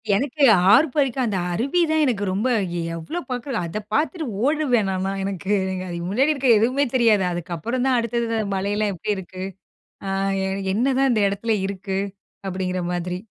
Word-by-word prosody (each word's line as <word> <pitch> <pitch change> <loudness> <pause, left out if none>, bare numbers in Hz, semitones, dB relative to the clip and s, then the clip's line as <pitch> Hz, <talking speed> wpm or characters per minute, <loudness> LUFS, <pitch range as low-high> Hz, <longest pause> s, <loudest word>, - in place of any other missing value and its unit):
எனக்கு 280 +6 -1 0.3
ஆர்பரிக்கும் 275 -2 +3
அந்த 205 -5 -1
அருவி 275 - +1
தான் 315 0 +3
எனக்கு 230 -7 0
ரொம்ப 205 +7 0
எவ் 190 -4 -3 0.2
எவ்வளோ 165 - -5
பாக்கிறது? 250 0 -3
அதை 170 +6 -4
பாத்துட்டு 315 - 0 0.2
ஓடுருவேன் 270 -7 +2
நான்லாம். 190 +1 -2
எனக்கு 195 0 -3 0.2
அங்க 185 0 -4
அ - - -5 0.2
முன்னாடி 270 +10 +2
இருக்க 275 -2 -1
எதுவுமே 255 +6 +2
தெரியாது. 225 -5 +4
அதுக்கப்புறம் 175 +9 -3
தான் 255 -2 +3
அடுத்தது 235 0 -1
அந்த 220 - -1
மலையெல்லாம் 205 +2 0
எப்படி 205 +4 -2
இருக்கு? 185 0 -7 0.6
அ - - -2 0.6
என்னதான் 265 +5 +2
இந்த 215 -3 +2
இடத்தில 215 +3 -1
இருக்கு? 195 0 -3 0.5
அப்படிங்கிற 185 -1 -2
மாதிரி. 180 0 -3
215 Hz, 160 wpm, -22 LUFS, 190-265 Hz, 0.6 s, தெரியாது